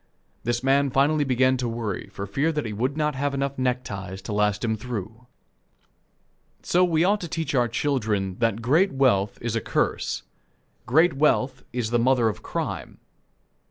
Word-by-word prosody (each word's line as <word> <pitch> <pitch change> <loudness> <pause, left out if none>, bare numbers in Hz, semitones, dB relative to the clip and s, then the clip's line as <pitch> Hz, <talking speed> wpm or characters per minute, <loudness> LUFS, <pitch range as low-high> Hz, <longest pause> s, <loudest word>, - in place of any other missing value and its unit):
This 120 +1 -1
man 140 +1 +3
finally 145 +3 +2
began 130 -1 +2
to 125 -1 -2
worry 115 -5 -4
for 100 - -5
fear 135 +11 0
he 150 -9 -3
would 130 +7 -1
not 150 -1 +1
have 140 +1 -1
enough 140 0 -2
neckties 100 -7 -2
to 105 - -5
last 105 +1 +1
him 110 -1 0
through. 115 +1 -6 1.4
So 180 +1 +3
we 165 -2 +3
ought 205 +3 +2
to 175 - -4
teach 160 -1 -3
our 125 -3 +3
children 110 -7 -1
that 115 -1 0
great 160 +11 +3
wealth 105 -7 +2
is 115 -1 -2
a 115 - 0
curse. - - -1 0.6
Great 160 +8 +4
wealth 135 -2 +1
is 120 -3 -2
the 120 - +3
mother 120 -1 +3
of 105 - -6
crime. - - -4
125 Hz, 165 wpm, -25 LUFS, 110-140 Hz, 1.4 s, Great